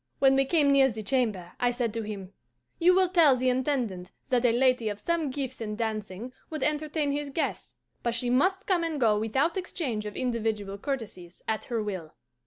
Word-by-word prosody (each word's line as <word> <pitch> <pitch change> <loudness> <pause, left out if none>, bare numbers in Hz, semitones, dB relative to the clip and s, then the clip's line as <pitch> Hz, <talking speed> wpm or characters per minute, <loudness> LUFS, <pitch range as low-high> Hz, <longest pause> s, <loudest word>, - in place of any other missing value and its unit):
When 270 -1 +5
we 270 0 +3
came 290 -1 +3
near 270 -1 +5
the 220 -2 -6
chamber, 210 -7 0
I 245 - +3
said 240 -3 -1
to 230 - -2
him, 200 -3 -7 0.5
'You 360 +2 +5
will 375 0 +4
tell 330 -7 +6
the 255 0 +1
Intendant 250 -8 -1 0.2
that 250 -1 +2
a 240 - +5
lady 250 -2 +2
of 205 -1 -5
some 335 +2 0
gifts 260 -2 -4
in 210 -1 -3
dancing 220 +1 -4 0.2
would 310 -4 -3
entertain 300 -1 0
his 290 0 -2
guests; 295 +4 -3 0.3
but 235 -1 -1
she 240 +1 0
must 380 +10 +2
come 360 -3 +2
and 320 -3 -2
go 215 -4 +3
without 270 - 0
exchange 265 - -3
of 210 - -7
individual 220 -5 -2
courtesies, 205 -10 -6
at 220 -1 -1
her 230 -4 -2
will. 185 -7 -5
250 Hz, 195 wpm, -28 LUFS, 215-285 Hz, 0.5 s, tell